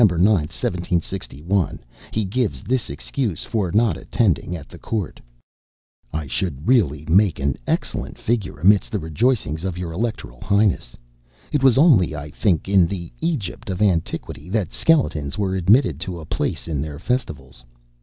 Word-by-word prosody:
9, 110 - +8
1761, 90 -1 0 0.3
he 110 -1 -1
gives 110 +3 -1
this 125 -6 -1
excuse 90 - -3
for 100 -6 -1
not 110 +1 +3
attending 90 - 0
at 80 - -8
the - - -13
court: 105 -7 -3 0.9
"I 80 -1 -3
should 75 +2 -3
really 85 - +3
make 95 +1 +4
an 70 -1 0
excellent - - -2
figure 110 -9 -2
amidst 100 +7 +4
the 110 - 0
rejoicings 80 - 0
of 95 -2 -3
your 90 -2 -4
electoral 85 - -4
highness. 100 - +1 0.5
It 145 - +1
was 130 -2 +5
only, 120 - +5
I 75 0 -7
think, 90 -2 +1
in 95 -3 +5
the 85 -2 -5
Egypt 120 - -3
of 95 -1 -3
antiquity 90 -4 -1
that 100 -4 -1
skeletons 80 - +1
were 95 -2 0
admitted 95 - +3
to 90 -1 -5
a 80 - -9
place 80 - -2
in 75 -4 -2
their 75 -1 -5
festivals. 75 - -3
95 Hz, 155 wpm, -22 LUFS, 80-110 Hz, 0.9 s, 9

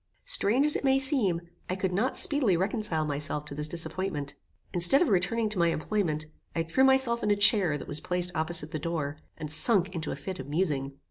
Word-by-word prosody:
Strange 270 - +2
as 300 - +4
it - - -3
may 270 -1 +3
seem, 265 - +1 0.3
I 185 - -1
could 190 -1 -2
not 215 +9 -1
speedily 255 - +2
reconcile 190 -5 -1
myself 150 0 -3
to 150 - -9
this 150 +1 -1
disappointment. 165 -3 -4 0.4
Instead 180 - +6
of 320 - -1
returning 220 +4 0
to 210 -3 -2
my 170 - +3
employment, 165 -2 -2 0.3
I 165 - 0
threw 165 +11 +1
myself 265 -3 +3
in - - -1
a 205 - +3
chair 200 -6 +3
that - - -10
was 145 - +2
placed 180 0 -1
opposite 160 -1 0
the 155 - -4
door, 155 -2 -4 0.2
and 155 -2 -6
sunk 185 +4 +4
into 165 -3 -4
a - - -4
fit 175 +5 -7
of 135 - -7
musing. 145 -4 -2
180 Hz, 210 wpm, -27 LUFS, 155-215 Hz, 0.4 s, Instead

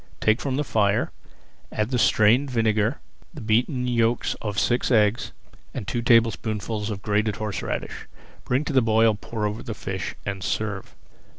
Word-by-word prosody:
Take 110 +2 +2
from 135 -2 -2
the 145 - 0
fire, 105 -6 +1 0.6
add 110 +3 -2
the 125 - +1
strained 110 +6 +4
vinegar, 110 +1 +1 0.4
the - - -7
beaten 125 +3 +1
yolks 115 -1 +1
of 105 -3 -4
six 120 +4 +1
eggs, 110 -1 +2 0.4
and 100 - -5
two 120 - -1
tablespoonfuls 110 -2 +1
of 100 -2 -5
grated 105 0 +1
horseradish. 105 -4 -4 0.4
Bring 130 +5 0
to 150 - -3
the 130 - +5
boil, 110 0 +4
pour 105 +1 -4
over 105 +2 -3
the 115 -4 -6
fish, 95 -2 -5
and 100 -1 -4
serve. 100 -2 -3
110 Hz, 160 wpm, -24 LUFS, 105-120 Hz, 0.6 s, the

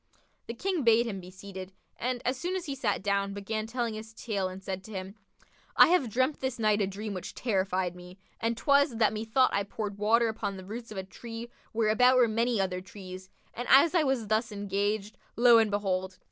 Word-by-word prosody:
The 230 - -5
King 370 +5 -1
bade 230 0 +5
him 205 -5 -4
be 180 0 -10
seated; 190 0 -9 0.2
and, 245 0 -3
as 255 - +1
soon 350 +8 -3
as 370 -2 -3
he 285 - -3
sat 230 -8 -1
down, 200 0 0
began 215 +2 -3
telling 235 -1 -2
his 220 +1 -9
tale 200 -5 -2
and 185 +1 -8
said 190 -1 -4
to 220 - -11
him, 190 -1 -6 0.6
"I - - +9
have 335 -9 +3
dreamt 260 +6 0
this 260 -2 -2
night 215 -2 +2
a 195 - +1
dream 205 +2 -5
which 185 - -7
terrified 190 -5 0
me, 180 +1 -12 0.2
and 230 0 -1
'twas, 280 0 +3
that 220 -2 +3
methought 225 +4 +2
I 200 - +2
poured 205 0 -5
water 230 +3 +3
upon 210 -3 -3
the 185 - -9
roots 230 +3 -7
of 210 - -7
a 190 - -2
tree 230 +4 -8 0.2
where 220 -1 +1
about 250 +4 +5
were 245 -2 +6
many 230 +1 +1
other 185 -1 -1
trees 185 0 -10 0.2
and 245 +2 -5
as 285 +5 +7
I 345 - +4
was 265 -6 0
thus 220 +2 0
engaged, 205 +1 -2 0.2
lo 235 -1 +7
and 220 -1 +3
behold! 190 -2 -1
215 Hz, 215 wpm, -29 LUFS, 195-240 Hz, 0.6 s, I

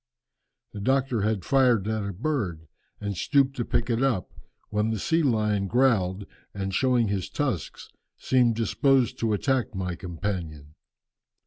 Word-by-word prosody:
The 105 - -6
doctor 130 -1 +1
had 105 -3 -1
fired 125 -7 +3
at 110 -1 -1
a 100 - -3
bird, 95 - -3 0.3
and 100 -1 -3
stooped 135 - +2
to 120 - 0
pick 115 - 0
it 120 0 0
up, 130 -10 0 0.4
when 105 +1 +1
the 110 - -1
sea 165 - +1
lion 105 -7 +1
growled, 100 -5 +2 0.3
and 95 -1 -3
showing 125 -1 +2
his 95 -2 -2
tusks, 120 - -3 0.3
seemed 125 -3 +2
disposed 125 +2 +2
to 115 -2 +1
attack 130 +1 0
my 90 -2 -3
companion. 85 -5 -5
110 Hz, 145 wpm, -26 LUFS, 95-130 Hz, 0.4 s, fired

